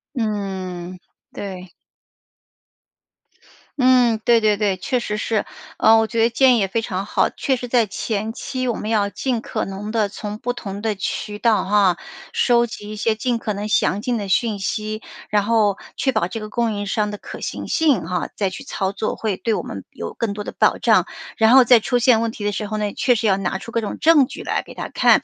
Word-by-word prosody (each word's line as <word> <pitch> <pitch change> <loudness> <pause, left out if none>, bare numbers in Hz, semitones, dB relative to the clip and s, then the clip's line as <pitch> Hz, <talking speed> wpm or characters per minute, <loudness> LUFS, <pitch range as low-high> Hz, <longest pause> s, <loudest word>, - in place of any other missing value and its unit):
嗯， 190 -5 -3 0.3
对。 185 -2 -7 2.1
嗯， 250 -3 +4
对 235 -1 +5
对 210 -1 +3
对， 205 -2 +1
确 250 +7 -1
实 210 -3 -3
是。 215 0 -1 0.3
呃， 225 0 +6
我 225 - +2
觉 225 +1 -1
得 230 - +4
建 250 +1 +4
议 - - +2
也 195 - +1
非 225 +4 -1
常 190 -3 -3
好， - - +1
确 270 - -1
实 245 -1 -6
在 235 -2 +3
前 215 +2 -3
期 255 +1 -4
我 235 - 0
们 215 - -4
要 210 -3 +2
尽 250 +3 -2
可 - - -3
能 195 +2 -6
地 215 -2 +1
从 210 +1 -6
不 245 - -2
同 205 -4 -6
的 220 -1 -1
渠 205 +2 -4
道， 230 -1 +4
啊， 195 -2 +3 0.4
收 240 -1 +3
集 225 -3 -8
一 215 - -6
些 220 +1 +1
尽 240 +1 -1
可 215 -2 -3
能 205 +1 -4
详 205 -1 +2
尽 240 +1 -1
的 205 -2 -4
讯 210 +2 +1
息， 215 +2 -3 0.3
然 210 -1 +2
后 210 -3 +2 0.2
确 265 - +1
保 220 -7 0
这 220 +4 -6
个 215 - -6
供 230 0 0
应 205 0 -3
商 210 +1 0
的 205 - -5
可 - - -9
行 - - -5
性， 280 - +2
哈， 180 +1 -2
再 200 -2 0
去 270 - -9
操 195 -7 -2
作， 200 +2 -3
会 210 -4 -2
对 225 - -1
我 - - -2
们 - - -7
有 - - -6
更 225 -3 -2
多 210 0 -5
的 - - -6
保 - - +2
障。 - - +3 0.3
然 220 0 +5
后 265 0 +9
在 245 0 +6
出 245 +3 0
现 235 -1 +5
问 230 0 -1
题 215 - -8
的 205 - +1
时 210 +1 -3
候 215 - -4
呢， 210 -1 -1
也 - - -6
确 250 -1 +2
实 225 0 0
要 195 -1 +3
拿 190 0 -2
出 230 - -9
各 230 - 0
种 215 - -4
证 305 -5 +5
据 - - -8
来 - - -1
给 - - -13
它 - - -6
看， - - +4
215 Hz, 245 characters per minute, -21 LUFS, 200-235 Hz, 2.1 s, 后